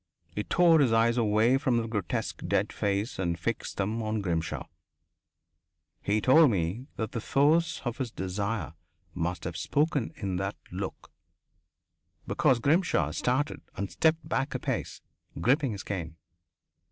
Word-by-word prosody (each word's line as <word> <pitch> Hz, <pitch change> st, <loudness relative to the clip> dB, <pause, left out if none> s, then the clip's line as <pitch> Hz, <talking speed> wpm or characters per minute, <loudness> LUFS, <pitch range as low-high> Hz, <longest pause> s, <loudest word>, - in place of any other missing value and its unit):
He 105 Hz, -, -2 dB
tore 170 Hz, +3 st, +5 dB
his 135 Hz, -5 st, +4 dB
eyes 115 Hz, +1 st, +4 dB
away 115 Hz, +2 st, +3 dB
from 125 Hz, -3 st, +1 dB
the 115 Hz, -1 st, -1 dB
grotesque 105 Hz, -6 st, -3 dB
dead -, -, +1 dB
face 100 Hz, +4 st, -1 dB
and 85 Hz, -3 st, 0 dB
fixed 110 Hz, +7 st, -3 dB
them 105 Hz, +4 st, -1 dB
on 110 Hz, 0 st, -1 dB
Grimshaw. 85 Hz, -4 st, -2 dB, 1.4 s
He 105 Hz, +2 st, +1 dB
told 150 Hz, +7 st, +6 dB
me 100 Hz, +5 st, -1 dB
that 110 Hz, -, -3 dB
the 115 Hz, -, -3 dB
force 160 Hz, +7 st, +2 dB
of 120 Hz, +2 st, -3 dB
his 130 Hz, -3 st, -2 dB
desire 100 Hz, -1 st, -3 dB, 0.4 s
must 85 Hz, 0 st, -2 dB
have 85 Hz, 0 st, -4 dB
spoken 145 Hz, -, 0 dB
in 95 Hz, -4 st, -3 dB
that 95 Hz, +2 st, -2 dB, 0.2 s
look -, -, -6 dB, 1.1 s
because 140 Hz, -7 st, +3 dB
Grimshaw 140 Hz, -, +2 dB
started 125 Hz, -, -1 dB, 0.2 s
and 100 Hz, -1 st, -3 dB
stepped 160 Hz, 0 st, +1 dB
back 135 Hz, +1 st, -1 dB
a -, -, -1 dB
pace, -, -, -3 dB, 0.4 s
gripping 135 Hz, -, +2 dB
his 100 Hz, -, -6 dB
cane. 85 Hz, -5 st, -4 dB
115 Hz, 145 wpm, -28 LUFS, 95-135 Hz, 1.4 s, told